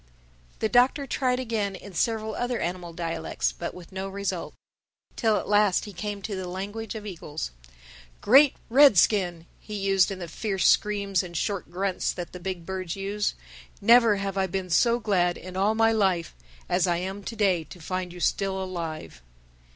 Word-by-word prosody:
The -, -, 0 dB
Doctor 250 Hz, +5 st, +3 dB
tried 255 Hz, -1 st, 0 dB
again, 220 Hz, -6 st, -2 dB
in 200 Hz, +1 st, -11 dB
several 220 Hz, +4 st, 0 dB
other 245 Hz, +1 st, -2 dB
animal 175 Hz, 0 st, -3 dB
dialects. 165 Hz, -1 st, -2 dB
But 170 Hz, -, -6 dB
with 180 Hz, -2 st, -12 dB
no 190 Hz, +1 st, -4 dB
result. 195 Hz, -2 st, -4 dB, 0.6 s
Till 220 Hz, -3 st, +2 dB
at -, -, -4 dB
last 205 Hz, -2 st, +3 dB
he 205 Hz, -, -9 dB
came 205 Hz, +2 st, -5 dB
to 200 Hz, +2 st, -3 dB
the 185 Hz, -1 st, -4 dB
language 205 Hz, +4 st, -5 dB
of 215 Hz, -1 st, -7 dB
eagles. 160 Hz, -, -6 dB, 0.7 s
"Great 270 Hz, +5 st, +6 dB
Red 270 Hz, -2 st, +7 dB
Skin," 175 Hz, -4 st, +2 dB
he 195 Hz, -2 st, -2 dB
said 190 Hz, +1 st, +5 dB
in -, -, -12 dB
the 175 Hz, -2 st, -6 dB
fierce 195 Hz, +2 st, -2 dB
screams 200 Hz, -2 st, +3 dB
and 175 Hz, -3 st, -6 dB
short 200 Hz, 0 st, -2 dB
grunts 185 Hz, +2 st, -1 dB
that 175 Hz, -2 st, -6 dB
the 180 Hz, -, -8 dB
big 180 Hz, -2 st, -5 dB
birds 185 Hz, -2 st, -4 dB
use, 200 Hz, +1 st, -2 dB, 0.4 s
"never 230 Hz, 0 st, +6 dB
have 195 Hz, -1 st, -3 dB
I 190 Hz, -, +1 dB
been 185 Hz, 0 st, -4 dB
so 235 Hz, +8 st, +4 dB
glad 180 Hz, -6 st, +1 dB
in 185 Hz, 0 st, -9 dB
all 200 Hz, +3 st, +2 dB
my 225 Hz, 0 st, +4 dB
life 190 Hz, -6 st, +1 dB, 0.3 s
as 180 Hz, 0 st, +2 dB
I 175 Hz, -1 st, +2 dB
am 190 Hz, +3 st, -5 dB
to 230 Hz, -, -6 dB
day 190 Hz, -6 st, +2 dB
to 180 Hz, -, -12 dB
find 185 Hz, +2 st, -4 dB
you 180 Hz, -, -10 dB
still 195 Hz, +1 st, 0 dB
alive." 170 Hz, -, -5 dB
195 Hz, 180 wpm, -26 LUFS, 180-210 Hz, 0.7 s, Red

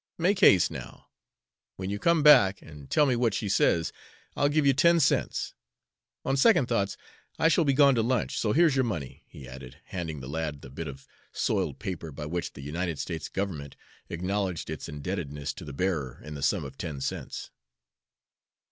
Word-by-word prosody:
"Make 185 Hz, +3 st, +2 dB
haste, 90 Hz, -, +6 dB
now. -, -, -9 dB, 0.7 s
When 95 Hz, +1 st, -4 dB
you 100 Hz, -, -3 dB
come 170 Hz, +3 st, +3 dB
back 100 Hz, -10 st, +7 dB
and 75 Hz, -3 st, -12 dB
tell 150 Hz, -, +4 dB
me 130 Hz, -3 st, +2 dB
what 115 Hz, -3 st, +1 dB
she 105 Hz, -, -2 dB
says, 85 Hz, -4 st, +2 dB, 0.4 s
I'll 145 Hz, -, +2 dB
give 150 Hz, 0 st, +2 dB
you 140 Hz, -, +5 dB
ten 170 Hz, +5 st, +4 dB
cents. 155 Hz, -, +1 dB, 0.7 s
On 135 Hz, -, +1 dB
second 140 Hz, -, +5 dB
thoughts, 100 Hz, -5 st, -1 dB, 0.4 s
I 160 Hz, -, +4 dB
shall 165 Hz, 0 st, +3 dB
be 140 Hz, -, +3 dB
gone 140 Hz, 0 st, +6 dB
to 115 Hz, -, +2 dB
lunch, 120 Hz, 0 st, 0 dB
so 105 Hz, -, +1 dB
here's 160 Hz, +1 st, +4 dB
your 130 Hz, -, +3 dB
money," 80 Hz, -, -4 dB
he 65 Hz, -, -12 dB
added, 65 Hz, 0 st, -10 dB
handing 80 Hz, -5 st, -5 dB
the 65 Hz, -, -8 dB
lad 75 Hz, -1 st, -4 dB
the 65 Hz, -, -10 dB
bit 80 Hz, +4 st, -6 dB
of 70 Hz, -1 st, -9 dB, 0.3 s
soiled -, -, -1 dB
paper 85 Hz, -4 st, -5 dB
by 75 Hz, +2 st, -7 dB
which 85 Hz, +3 st, -3 dB
the -, -, -10 dB
United 85 Hz, +3 st, -3 dB
States 80 Hz, +1 st, -4 dB
government 80 Hz, -8 st, -4 dB, 0.3 s
acknowledged 90 Hz, 0 st, -2 dB
its -, -, -6 dB
indebtedness 75 Hz, -2 st, -4 dB
to -, -, -10 dB
the 75 Hz, -, -7 dB
bearer 70 Hz, -4 st, -2 dB
in 75 Hz, -, -7 dB
the 70 Hz, -, -7 dB
sum 80 Hz, +2 st, +1 dB
of 65 Hz, 0 st, -10 dB
ten 75 Hz, -6 st, -4 dB
cents. -, -, -5 dB
90 Hz, 190 wpm, -28 LUFS, -, 0.7 s, back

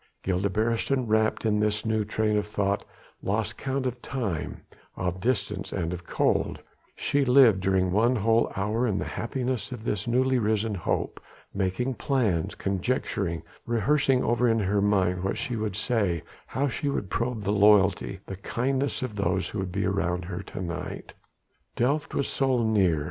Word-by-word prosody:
Gilda 95 Hz, +2 st, 0 dB
Beresteyn, 115 Hz, +5 st, 0 dB
wrapped 110 Hz, +1 st, +2 dB
in 105 Hz, -1 st, +2 dB
this 105 Hz, 0 st, 0 dB
new 110 Hz, -1 st, +1 dB
train 105 Hz, +1 st, 0 dB
of 105 Hz, 0 st, 0 dB
thought, 100 Hz, -1 st, 0 dB, 0.4 s
lost 105 Hz, +2 st, -1 dB
count 135 Hz, -1 st, -2 dB
of 125 Hz, -1 st, -3 dB
time, 105 Hz, -, -3 dB, 0.4 s
of 90 Hz, 0 st, -2 dB
distance 105 Hz, -4 st, -1 dB
and 85 Hz, -3 st, -2 dB
of 85 Hz, -1 st, -7 dB
cold: -, -, +1 dB, 0.4 s
she 145 Hz, 0 st, +1 dB
lived 125 Hz, -6 st, +6 dB
during 95 Hz, -1 st, +1 dB
one 115 Hz, +6 st, +3 dB
whole 115 Hz, +1 st, +2 dB
hour 105 Hz, +5 st, 0 dB
in 100 Hz, -4 st, 0 dB
the -, -, -2 dB
happiness 125 Hz, +1 st, -3 dB
of 120 Hz, -3 st, -6 dB
this 105 Hz, -1 st, -2 dB
newly 130 Hz, +2 st, +2 dB
risen 110 Hz, 0 st, +1 dB
hope, 90 Hz, -4 st, -2 dB, 0.3 s
making 100 Hz, +7 st, -1 dB
plans, 105 Hz, -, 0 dB
conjecturing, 95 Hz, -4 st, -1 dB, 0.2 s
rehearsing 130 Hz, +3 st, +2 dB
over 120 Hz, +1 st, +2 dB
in 115 Hz, -, +3 dB
her 100 Hz, -1 st, +1 dB
mind 95 Hz, -3 st, +2 dB
what 95 Hz, -, -1 dB
she 125 Hz, -4 st, -2 dB
would 105 Hz, -3 st, -2 dB
say, 100 Hz, -7 st, 0 dB, 0.2 s
how 140 Hz, +2 st, 0 dB
she 140 Hz, +2 st, -2 dB
would 100 Hz, -9 st, -3 dB
probe 115 Hz, -2 st, -1 dB
the 100 Hz, -, 0 dB
loyalty, 100 Hz, -2 st, +4 dB
the 95 Hz, -, -6 dB
kindness 135 Hz, +7 st, -1 dB
of 120 Hz, -5 st, -4 dB
those 95 Hz, -1 st, 0 dB
who 105 Hz, -, -4 dB
would 95 Hz, -1 st, -3 dB
be 100 Hz, +2 st, -1 dB
around 90 Hz, -2 st, 0 dB
her 90 Hz, +1 st, -4 dB
to 95 Hz, -, -7 dB
night. 85 Hz, -1 st, -5 dB, 0.6 s
Delft 145 Hz, +5 st, 0 dB
was 140 Hz, -, +1 dB
so 130 Hz, -3 st, +1 dB
near! 95 Hz, -8 st, +3 dB
105 Hz, 170 wpm, -27 LUFS, 95-125 Hz, 0.6 s, lived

